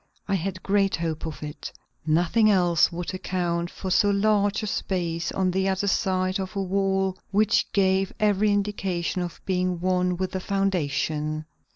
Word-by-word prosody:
I 200 - -1
had 185 0 -2
great 195 -1 +2
hope 165 -1 -3
of 155 -1 -7
it. 150 0 -7 0.4
Nothing 175 +8 +3
else 175 -5 +3
would 175 +2 -4
account 175 -2 -2
for 190 - -6
so 205 - +4
large 205 +1 +2
a - - -1
space 170 -5 -2
on 185 -1 0
the 190 +1 +1
other 190 +1 0
side 185 -1 +1
of 190 +1 -5
a 195 - 0
wall 190 0 0
which 210 +1 +2
gave 190 -1 +2
every 210 -1 +3
indication 195 -3 -1
of 175 -1 -5
being 180 -2 0
one 180 0 +1
with 185 0 -2
the 190 - -2
foundation. 155 -5 -1
185 Hz, 165 wpm, -25 LUFS, 175-195 Hz, 0.4 s, so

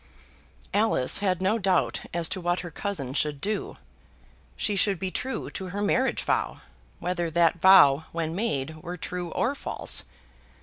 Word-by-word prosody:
Alice 205 -11 +3
had 185 -2 0
no 210 +5 +2
doubt 190 -2 +1
as 170 -1 0
to 185 - -3
what 175 +1 0
her 175 - -8
cousin 150 -8 -3
should 150 0 -1
do. 210 +7 -3 0.8
She 210 - -1
should 195 0 +2
be 185 +2 -4
true 265 +6 -4
to 190 - -6
her 195 +3 -4
marriage 260 +5 +1
vow, - - -1 0.4
whether 175 -1 -2
that 170 0 +2
vow 160 -6 +7
when 165 -1 -3
made 155 -7 -2
were 175 +2 -6
true 180 +1 -5
or 245 - 0
false. - - 0
180 Hz, 160 wpm, -26 LUFS, 165-200 Hz, 0.8 s, vow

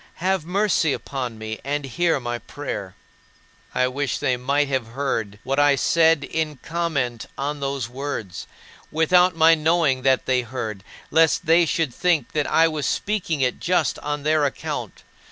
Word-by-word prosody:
Have 185 -2 -1
mercy 180 -5 +2
upon 125 -5 -5
me 110 0 -6
and 145 +1 -2
hear 165 +4 +1
my 120 -1 -4
prayer." 105 -11 -6 0.8
I 130 - +3
wish 130 0 -2
they 125 - +1
might 140 +4 0
have 130 -4 -1
heard 110 -7 -2
what 135 +2 -1
I 145 -1 +5
said 160 +2 +3
in 155 -1 -3
comment 145 -9 -2
on 145 +2 -3
those 135 -4 -2
words 125 -7 -5 0.4
without 180 +3 +3
my 165 0 +6
knowing 160 -4 +2
that 130 0 +2
they 130 -1 +2
heard, 110 -5 -5 0.3
lest 165 +2 +3
they 165 +1 +4
should 155 -5 0
think 165 -7 +1
that 150 -2 0
I 165 0 +4
was 155 -3 -2
speaking 185 -8 -1
it 125 -1 0
just 180 0 +1
on 145 0 -4
their 155 0 +2
account. 140 - -4
145 Hz, 160 wpm, -23 LUFS, 130-165 Hz, 0.8 s, my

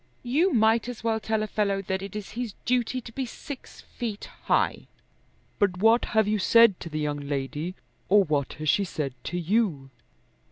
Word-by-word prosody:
"You 305 +10 +2
might 225 0 +3
as 240 -2 -7
well 225 -1 +1
tell 220 0 -1
a - - -2
fellow 200 -2 0
that 190 0 -2
it 195 +1 -7
is 210 -2 -6
his 230 -2 -4
duty 250 +1 +1
to 230 - -10
be 260 +2 -3
six 275 +3 -9
feet 220 -4 -6 0.2
high." - - +1 0.7
"But 190 -3 +2
what 225 +5 +4
have 220 -2 +5
you 210 0 +1
said 230 -1 +5
to 170 - -7
the 155 - -4
young 145 -1 -1
lady, 145 +5 -3 0.3
or 205 +1 +6
what 150 -5 -1
has 155 +1 -6
she 200 - +3
said 150 -7 -3
to 175 - -3
you?" 170 - 0
205 Hz, 190 wpm, -26 LUFS, 170-230 Hz, 0.7 s, or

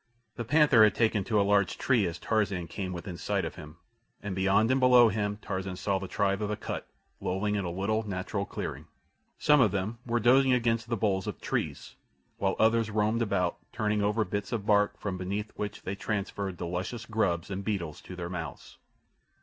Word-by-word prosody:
The 120 - -3
panther 140 -2 +5
had 105 - +4
taken 110 -3 +2
to 110 -3 +2
a - - +4
large 100 -2 +2
tree 120 -8 +2
as 85 0 -4
Tarzan 100 -3 0
came 95 +2 -4
within 90 0 -6
sight - - -1
of - - -5
him, 75 +2 -11 0.5
and 100 -2 -3
beyond 100 +5 +3
and 130 - +3
below 125 -2 +7
him 105 0 -1
Tarzan 95 0 -3
saw 95 +1 -1
the 95 - -6
tribe 100 +1 0
of 105 - -1
Akut 105 - -4 0.3
lolling 100 +3 -1
in 100 -2 -1
a - - -2
little, 100 +5 0
natural 100 +1 -2
clearing. - - -5 0.5
Some 150 -2 +5
of 110 - +5
them 100 +4 -3
were 120 -1 0
dozing 130 +3 +5
against 115 -2 +1
the 115 - 0
boles 95 -1 0
of 105 - -4
trees, - - -3 0.4
while 95 -1 +1
others 115 0 +3
roamed 110 +2 +1
about 90 -6 0
turning 105 -2 0
over 105 +2 +1
bits 100 +1 -3
of 110 -4 -2
bark 105 -1 +3
from 95 -3 -4
beneath 100 +3 -3
which 105 0 -5
they 95 - -3
transferred 100 -2 -3
the 85 - -4
luscious 95 +7 -4
grubs 100 -6 0
and 100 +1 -3
beetles 95 -7 -3
to 90 - -9
their 85 -1 -5
mouths. 85 -2 -7
105 Hz, 200 wpm, -29 LUFS, 95-110 Hz, 0.5 s, below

